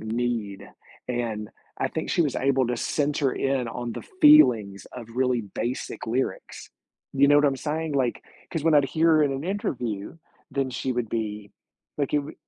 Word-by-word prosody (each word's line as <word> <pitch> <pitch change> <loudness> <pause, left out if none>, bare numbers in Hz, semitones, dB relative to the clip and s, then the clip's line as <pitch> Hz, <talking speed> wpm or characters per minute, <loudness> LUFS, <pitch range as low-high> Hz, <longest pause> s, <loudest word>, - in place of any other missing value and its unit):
need, 110 -3 -3 0.4
and 115 -4 -3 0.3
I - - 0
think - - -4
she - - +1
was 145 -4 -1
able 135 -1 +2
to 120 - -1
center 145 +1 0
in 135 -3 0
on 120 0 -5
the - - -7 0.2
feelings 115 - +6
of 120 -3 -9
really 125 -2 +2
basic 120 +6 -5
lyrics. 125 +4 -3 0.5
You 140 +1 +5
know 145 - +6
what 145 - +4
I'm 135 -1 +1
saying, 155 +2 -3
like, 130 -3 0 0.3
‘cause 165 -4 -3
when 165 -1 +4
I'd 145 -2 +5
hear 160 +2 +3
in 140 -2 +1
an 135 +1 -4
interview, 125 - -3 0.3
then 135 -1 -1
she 130 +1 -2
would 120 -2 -2
be 105 -2 -4 0.5
like, 140 - -1
it 150 - +5
would 145 +2 -9
130 Hz, 180 wpm, -25 LUFS, 115-145 Hz, 0.5 s, feelings